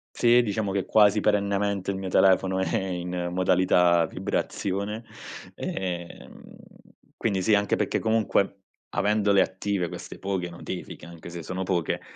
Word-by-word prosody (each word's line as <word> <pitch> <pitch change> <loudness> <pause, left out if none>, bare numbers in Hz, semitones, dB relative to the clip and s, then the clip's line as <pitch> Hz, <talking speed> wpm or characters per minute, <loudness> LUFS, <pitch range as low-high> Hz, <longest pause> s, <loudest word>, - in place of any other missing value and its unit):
Sì, 120 +1 +5
diciamo 105 -2 -2
che 95 -2 -1
quasi 105 -1 +4
perennemente 100 -1 0
il 95 - -1
mio 95 -1 -4
telefono 95 0 +3
è 95 - -1
in 90 -1 -3
modalità 90 -1 +3
vibrazione, 100 +8 -3 0.5
ehm, 90 -2 -5 0.8
quindi 100 -4 -1
sì 105 +3 +4
anche 100 -1 +1
perché - - 0
comunque 110 -3 +1 0.3
avendole 105 -1 +2
attive 95 -2 -1
queste - - -9
poche 95 -3 -2
notifiche, 85 - -7
anche 85 0 -11
se 85 -1 -7
sono 95 +4 -4
poche, 90 -3 -1
95 Hz, 135 wpm, -26 LUFS, 90-100 Hz, 0.8 s, Sì